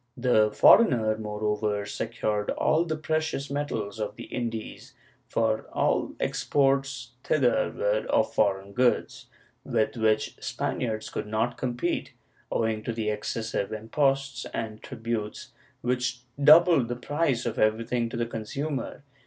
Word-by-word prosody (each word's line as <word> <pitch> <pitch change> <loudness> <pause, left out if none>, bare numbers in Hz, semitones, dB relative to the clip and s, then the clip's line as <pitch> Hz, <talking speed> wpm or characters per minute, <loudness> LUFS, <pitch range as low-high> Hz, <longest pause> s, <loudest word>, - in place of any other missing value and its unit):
The 120 -4 +3
foreigner, 110 - +5
moreover, 105 -1 -1
secured 105 -1 -2
all 160 +2 +2
the 160 -2 -2
precious 155 -2 -2
metals 115 -8 -3
of 105 -1 -3
the - - -8
Indies, 115 -3 -5 0.3
for 110 -1 0
all - - 0
exports 135 -3 0
thither 130 -5 +2
were - - 0
of - - +2
foreign 100 -1 +1
goods, 125 +1 +1 0.4
with 110 0 0
which 110 -1 +1
Spaniards 110 -3 -3
could 105 - -4
not 110 +3 0
compete, 120 -1 -2 0.4
owing 110 -1 0
to 115 - -3
the 110 -2 -1
excessive 105 0 -3
imposts 135 +3 0
and 110 -1 -4
tributes, 115 -4 -5 0.3
which 125 0 -1 0.2
doubled 155 -3 +7
the 120 - -3
price 135 -1 -1
of 115 -2 -2
everything 115 +2 +1
to 120 - -5
the 120 - 0
consumer. 135 +6 -4
115 Hz, 130 wpm, -27 LUFS, 110-135 Hz, 0.4 s, doubled